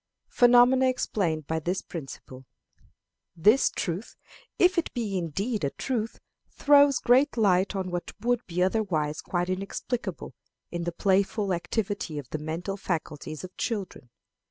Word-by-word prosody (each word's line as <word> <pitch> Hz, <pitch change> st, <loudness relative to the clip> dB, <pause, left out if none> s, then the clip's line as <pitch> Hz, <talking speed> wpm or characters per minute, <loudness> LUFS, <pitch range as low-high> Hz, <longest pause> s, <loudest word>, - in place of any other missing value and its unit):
Phenomena 245 Hz, +2 st, +5 dB
explained 175 Hz, -, -1 dB
by 160 Hz, +2 st, -1 dB
this 175 Hz, +4 st, -2 dB
Principle. 135 Hz, -4 st, -9 dB, 0.9 s
This 210 Hz, +10 st, +4 dB
truth, 180 Hz, +5 st, -4 dB, 0.4 s
if 360 Hz, 0 st, +4 dB
it 335 Hz, -, -3 dB
be 220 Hz, -5 st, -2 dB
indeed 190 Hz, -, -2 dB
a 140 Hz, -, +1 dB
truth, 230 Hz, -, -3 dB, 0.3 s
throws 285 Hz, -2 st, +5 dB
great 255 Hz, +3 st, +3 dB
light 195 Hz, -3 st, +3 dB
on 185 Hz, -2 st, -3 dB
what 175 Hz, 0 st, -4 dB
would 240 Hz, +2 st, 0 dB
be 180 Hz, 0 st, 0 dB
otherwise 180 Hz, -7 st, 0 dB
quite 180 Hz, 0 st, -2 dB
inexplicable 195 Hz, +6 st, -4 dB, 0.4 s
in 170 Hz, -1 st, -3 dB
the 175 Hz, -, -1 dB
playful 195 Hz, +2 st, +1 dB
activity 190 Hz, -2 st, -3 dB
of 145 Hz, -4 st, -6 dB
the 155 Hz, -, -3 dB
mental 165 Hz, +6 st, -4 dB
faculties 155 Hz, -4 st, -4 dB
of 185 Hz, 0 st, -9 dB
children. 195 Hz, -, -4 dB
190 Hz, 135 wpm, -27 LUFS, 170-235 Hz, 0.9 s, Phenomena